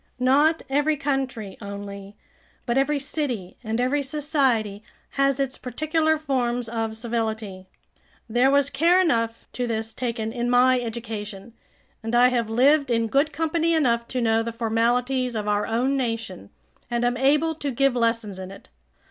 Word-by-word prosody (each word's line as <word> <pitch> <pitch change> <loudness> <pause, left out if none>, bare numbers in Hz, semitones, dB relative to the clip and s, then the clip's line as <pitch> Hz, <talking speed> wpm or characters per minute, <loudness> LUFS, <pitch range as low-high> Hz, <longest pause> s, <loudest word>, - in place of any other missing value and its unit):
Not 285 +6 +3
every 290 +3 +1
country 265 -8 -3
only, 200 0 -8 0.5
but 235 - 0
every 275 +2 +2
city 270 - -3
and 225 +1 -2
every 260 +4 +1
society 270 -8 0 0.3
has 275 0 +1
its 270 -1 -2
particular 310 +5 0
forms 245 -5 -1
of 225 -1 -3
civility. 220 -5 -3 0.6
There 240 +4 +3
was 280 0 +2
care 335 +6 +4
enough 230 -10 0
to 245 -1 -2
this 225 -1 -2
taken 225 -3 -3
in 240 0 -2
my 250 +1 +4
education, 220 -2 -6 0.5
and 225 +1 -2
I 245 +1 +6
have 235 -3 -1
lived 275 +5 +3
in 230 -1 +1
good 280 +6 +2
company 330 +1 0
enough 235 -6 +1
to 255 - -2
know 225 -1 +2
the 230 +1 -3
formalities 240 +2 0
of 210 -1 -3
our 205 0 +1
own 245 +5 +1
nation, 225 - -3 0.4
and 240 0 0
am 245 0 +1
able 295 +5 +2
to 295 -2 -4
give 275 0 +1
lessons 230 -4 0
in 185 0 -7
it. 195 - -13
245 Hz, 155 wpm, -24 LUFS, 225-275 Hz, 0.6 s, I